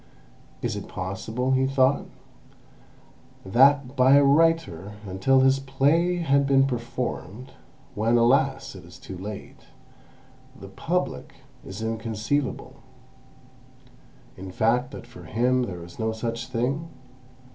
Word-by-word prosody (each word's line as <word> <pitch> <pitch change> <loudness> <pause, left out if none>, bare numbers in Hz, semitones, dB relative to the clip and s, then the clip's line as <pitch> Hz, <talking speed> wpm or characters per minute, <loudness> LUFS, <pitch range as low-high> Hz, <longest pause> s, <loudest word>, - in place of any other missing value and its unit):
"Is - - -1
it - - -6
possible," 110 +7 -3
he 130 0 +2
thought, 135 0 +2 1.4
"that, 135 +5 +4
by 130 +1 +5
a 140 - +6
writer, 140 - +2
until 125 +8 +2
his 135 +1 +4
play 145 +6 +1
has 140 -5 +2
been 135 -1 +4
performed 125 -2 -5 0.4
(when, 115 +3 +2
alas! 135 +3 +2
it 95 -2 -11
is 85 +1 -14
too 95 - -9
late), 100 +3 -9 0.9
'the 100 - -10
Public' 170 - -3 0.3
is 95 +4 -7
inconceivable—in 115 +5 -3 1.7
fact 120 +6 +1
that 135 - -10
for 120 0 -13
him 125 +2 +1
there 90 -4 -7
is 85 0 -13
no 110 0 0
such 115 +1 -4
thing? 135 +8 -2
125 Hz, 115 wpm, -25 LUFS, 110-135 Hz, 1.7 s, a